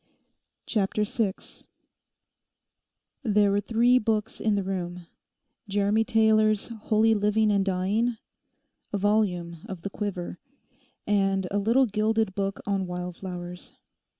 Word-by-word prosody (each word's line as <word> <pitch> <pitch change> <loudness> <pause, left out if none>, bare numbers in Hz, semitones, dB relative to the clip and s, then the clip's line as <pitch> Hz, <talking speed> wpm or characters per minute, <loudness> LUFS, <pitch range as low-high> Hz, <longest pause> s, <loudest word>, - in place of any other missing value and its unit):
CHAPTER 210 0 0
SIX 210 -2 -3 1.6
There 210 -5 +3
were 200 +1 +2
three 240 +3 +3
books 215 -1 -1
in 215 -2 +2
the 200 - 0
room—Jeremy 195 +3 -3
Taylor's 215 -1 +3
'Holy 225 0 +2
Living 210 +1 +2
and 200 -1 +2
Dying,' 200 +5 0 0.7
a 205 - 0
volume 190 -5 0
of 185 -3 -7
the 200 - -4
Quiver, 185 -4 -4 0.7
and 195 -2 +1
a 205 - +1
little 230 +6 +3
gilded 215 -1 0
book 195 0 -2
on 195 -2 -1
wildflowers. 180 0 -7
205 Hz, 110 wpm, -26 LUFS, 190-220 Hz, 1.6 s, There